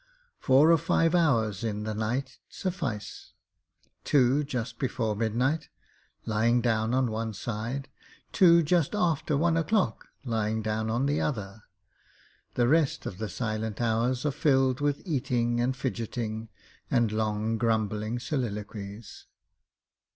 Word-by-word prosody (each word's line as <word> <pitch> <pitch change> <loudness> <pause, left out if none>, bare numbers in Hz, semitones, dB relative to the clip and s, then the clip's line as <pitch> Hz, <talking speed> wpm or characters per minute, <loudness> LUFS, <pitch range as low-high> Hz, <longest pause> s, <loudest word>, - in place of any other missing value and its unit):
Four 140 +5 +5
or 165 - +5
five 165 +3 +2
hours 115 - +2
in 105 -2 -2
the 110 0 -3
night 125 +5 -3
suffice 120 - -5 0.7
two 135 +1 +3
just 125 -4 -4
before 115 -5 -1
midnight, 125 +8 0 0.6
lying 115 +3 +2
down 115 0 +1
on 130 -3 +1
one 110 0 -3
side; 120 +6 -4 0.4
two 170 -2 +6
just 170 +3 +1
after 160 -6 +1
one 165 +2 +2
o'clock, 195 +5 0 0.2
lying 110 -2 -1
down 110 +1 -1
on 120 +4 0
the 145 +1 +1
other. 105 -6 -4 0.9
The 120 -1 +3
rest 155 +1 +2
of 95 - -6
the 110 -1 -3
silent 110 +1 -3
hours 120 +3 0
are 150 - +2
filled 135 -2 +2
with 145 -1 0
eating 125 -7 0
and 130 +1 0
fidgeting 115 -3 -4 0.4
and 120 -4 +2
long 110 +1 -1
grumbling 110 0 0
soliloquies. 105 - -5
120 Hz, 130 wpm, -28 LUFS, 110-140 Hz, 0.9 s, two